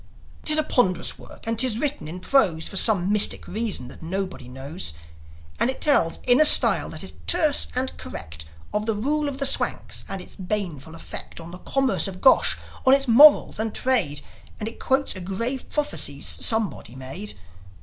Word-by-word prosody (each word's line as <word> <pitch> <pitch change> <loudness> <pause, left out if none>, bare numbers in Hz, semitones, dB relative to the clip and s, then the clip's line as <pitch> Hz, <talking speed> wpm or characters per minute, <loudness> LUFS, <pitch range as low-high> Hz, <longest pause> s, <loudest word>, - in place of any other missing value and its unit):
'Tis 305 0 +5
a 310 - +3
ponderous 185 - -1
work, - - -14
and 225 0 -3
'tis 245 -3 +4
written 290 - -3
in 170 +4 -8
prose, 185 -7 +1
For - - -8
some 195 -2 +2
mystical 210 -3 +2
reason 215 - -1
that - - -14
nobody 185 -5 -5
knows; 135 - -6 0.7
And 240 - +1
it 265 - -3
tells 220 - +2
in 250 +4 +4
a - - +8
style - - +6
that - - -7
is - - -7
terse 315 -5 +3
and 260 +1 -1
correct 80 -1 -8 0.3
Of 210 +1 -2
the 225 - 0
rule 290 +7 -1
of 270 - -7
the 275 - -2
Swanks 270 - +2
and 195 - -5
its 180 - -11
baneful 180 -6 -5
effect 165 - -8
On 165 +1 -11
the 180 - -11
commerce 270 -2 -1
of 185 -1 -8
Gosh, 260 - +3 0.3
on 260 0 +5
its 275 -1 -1
morals 285 +1 +6
and 220 0 -3
trade; 185 - 0 0.4
And 215 - -5
it 225 - -8
quotes 265 -2 0
a 185 - -8
grave 230 +8 -5
prophecy 295 -1 -2
somebody 210 - -1
made. 135 +11 -8
215 Hz, 185 wpm, -23 LUFS, 175-265 Hz, 0.7 s, a